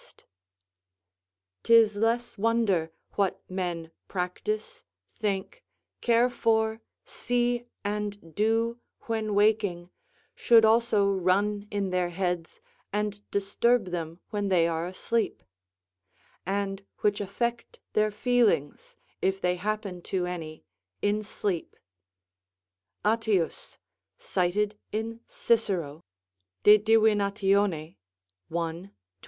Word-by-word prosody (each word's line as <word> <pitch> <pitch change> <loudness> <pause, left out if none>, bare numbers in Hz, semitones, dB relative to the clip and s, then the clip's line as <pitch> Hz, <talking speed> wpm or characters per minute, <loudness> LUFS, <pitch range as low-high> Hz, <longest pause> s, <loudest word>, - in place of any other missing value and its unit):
["'Tis 225 -2 +5
less 230 +3 0
wonder, 205 -7 +1 0.2
what 200 -2 0
men 175 -3 -4 0.2
practise, 425 - -3 0.3
think, 205 - -3 0.4
care 235 +1 +4
for, 220 -2 +1 0.2
see, 240 0 -1 0.2
and 205 -4 -4
do 225 +4 +1 0.2
when 220 -2 -2
waking, 205 -4 +2 0.4
(should 230 -2 +5
also 220 -2 +4
run 200 +3 +1
in 200 -2 -2
their 180 -1 +1
heads 175 -2 -3 0.3
and 210 0 -2
disturb 200 +1 +1
them 165 -1 -4
when 205 -2 -1
they 175 -3 +3
are 165 0 -2
asleep) 225 +5 -2 1.0
and 195 0 -2 0.2
which 205 0 +1
affect 235 +4 -3
their 215 0 +3
feelings, 245 - +1 0.3
if 190 0 +1
they 180 -1 +1
happen 200 -1 -3
to 180 0 -2
any 160 -3 -6 0.4
in 205 +1 +2
sleep." 200 -4 -3 1.3
Attius, 220 - 0 0.4
cited 205 +3 0
in 225 +1 -3
Cicero, 180 -10 0 0.6
De 210 +1 +8
Divin., 220 -1 +4
i. 200 - +1 1.2
22. 170 +2 -3
205 Hz, 95 wpm, -28 LUFS, 180-225 Hz, 1.3 s, De